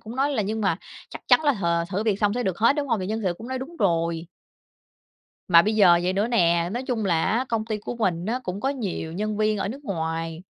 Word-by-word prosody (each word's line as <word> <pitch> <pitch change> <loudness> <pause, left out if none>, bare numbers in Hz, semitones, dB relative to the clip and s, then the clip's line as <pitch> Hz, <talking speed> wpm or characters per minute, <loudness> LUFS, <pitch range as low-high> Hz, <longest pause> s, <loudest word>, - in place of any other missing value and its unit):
cũng 225 +3 -9
nói 275 +2 +1
là 250 -7 0
nhưng 215 +3 -3
mà 195 -6 +1 0.3
chắc - - -9
chắn - - +6
là 290 - +4
th 170 -4 -1
thử 195 +2 -1
việc 210 -3 0
xong 205 -1 +2
sẽ 245 - -1
được 190 -6 -2
hết, 235 +6 +4
đúng 290 -2 -2
hông? 230 -4 +1
Thì 185 - -3
nhân 220 +3 -2
sự 180 -2 0
cũng 230 - -9
nói 260 0 -3
đúng 285 +7 -8
rồi. 170 -2 0 1.2
Mà 170 -2 +7
bây 215 +3 0
giờ 185 -5 +6
vậy 180 +1 0
nữa 205 +4 0
nè, 170 -6 +2
nói 240 +3 -3
chung 245 -4 -2
là 165 -4 +1
á 235 +4 +1
công 225 -2 -1
ty 220 -1 -3
của 235 - -6
mình 180 -6 -1
á 240 +4 -1
cũng 190 -2 -5
có 265 - 0
nhiều 205 -11 -4
nhân 210 +4 -2
viên 215 0 +1
ở - - -2
nước 275 +7 -8
ngoài, 165 -3 -3
205 Hz, 265 wpm, -24 LUFS, 175-230 Hz, 1.2 s, Mà